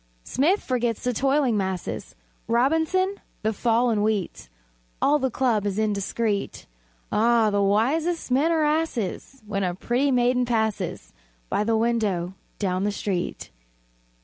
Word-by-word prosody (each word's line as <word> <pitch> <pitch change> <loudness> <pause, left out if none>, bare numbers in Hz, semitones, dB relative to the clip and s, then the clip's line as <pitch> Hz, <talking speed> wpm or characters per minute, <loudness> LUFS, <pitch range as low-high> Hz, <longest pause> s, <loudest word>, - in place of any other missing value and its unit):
Smith 340 +10 +1
forgets 240 -3 -1
the 250 - 0
"toiling 270 0 +2
masses," 190 -3 -3 0.3
Robinson, 320 - +2 0.3
the 220 +1 +1
fall 235 +3 +2
in 210 -2 +1
wheat; 210 - -2 0.5
All 295 +1 +3
the 265 -1 0
club 235 -4 +1
is 200 0 -2
indiscret. 210 0 -1 0.5
Ah, 225 -1 +3
the 200 0 +1
wisest 265 - +1
men 285 +6 +3
are 320 -2 +2
asses 275 - -2
When 200 -2 -2
a 180 -1 -1
pretty 245 +8 0
maiden 250 -1 +2
passes 220 -3 -2 0.4
By - - +1
the 225 +1 +1
window 215 -6 0 0.2
down 185 -2 -1
the 205 - +1
street! 195 -3 -3
230 Hz, 135 wpm, -25 LUFS, 205-265 Hz, 0.5 s, All